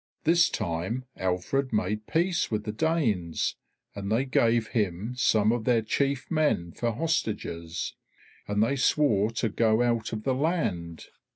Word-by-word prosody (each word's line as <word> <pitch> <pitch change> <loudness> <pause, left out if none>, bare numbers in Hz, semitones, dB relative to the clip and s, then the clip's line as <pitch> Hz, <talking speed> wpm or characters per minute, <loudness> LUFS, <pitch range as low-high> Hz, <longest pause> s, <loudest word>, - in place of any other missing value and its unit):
This 170 +2 +4
time 95 +6 -3
Alfred 95 +9 -1
made 105 0 -1
peace 175 +1 +1
with 105 -2 -2
the 105 - -3
Danes, 110 - 0 0.4
and 100 0 -5
they 120 +5 +2
gave 115 -3 +2
him 105 +1 -1
some 110 -3 +3
of 120 -1 -1
their 115 -1 +2
chief 140 +5 -1
men 150 - +1
for 120 +5 -1
hostages, 105 - -2 0.5
and 105 +1 +2
they 140 +5 +1
swore 115 -7 +3
to 115 +1 0
go 110 +2 +2
out 115 -2 0
of 110 -1 -4
the 135 - +1
land. 125 - -1
115 Hz, 150 wpm, -27 LUFS, 100-135 Hz, 0.5 s, This